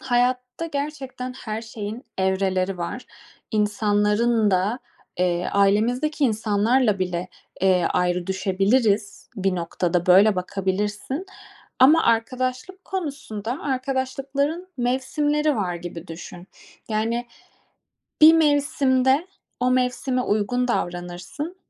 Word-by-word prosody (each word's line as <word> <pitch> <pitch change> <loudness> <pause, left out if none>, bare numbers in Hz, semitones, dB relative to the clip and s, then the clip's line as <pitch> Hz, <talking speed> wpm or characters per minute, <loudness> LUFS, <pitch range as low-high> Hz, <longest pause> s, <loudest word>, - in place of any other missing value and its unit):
Hayatta 250 +3 0
gerçekten 280 -4 -5
her 225 -3 -5
şeyin 225 +2 -7
evreleri 190 -1 0
var, 205 +9 -5 0.4
insanların 210 +1 +2
da. 195 +6 +1 0.4
Eee, 180 -1 +1
ailemizdeki 240 +10 +2
insanlarla 220 0 +2
bile, 180 -1 -2 0.3
eee, 185 -2 +3
ayrı 180 -1 0
düşebiliriz 200 +3 0
bir 195 -1 0
noktada. 175 0 -1
Böyle 195 +3 +6
bakabilirsin. 205 - -2 0.5
Ama 300 +6 +6
arkadaşlık 255 +10 -1
konusunda 275 - -4
arkadaşlıkların 275 +5 -2
mevsimleri 290 +4 0
var 180 -4 -1
gibi 175 0 -7
düşün. 175 +2 -10 0.4
Yani 230 +2 -1 0.9
bir 315 +1 +9
mevsimde 285 -2 +2 0.3
o 250 0 +2
mevsime 255 0 0
uygun 245 +4 0
davranırsın 180 - -4
225 Hz, 95 wpm, -23 LUFS, 195-265 Hz, 0.9 s, bir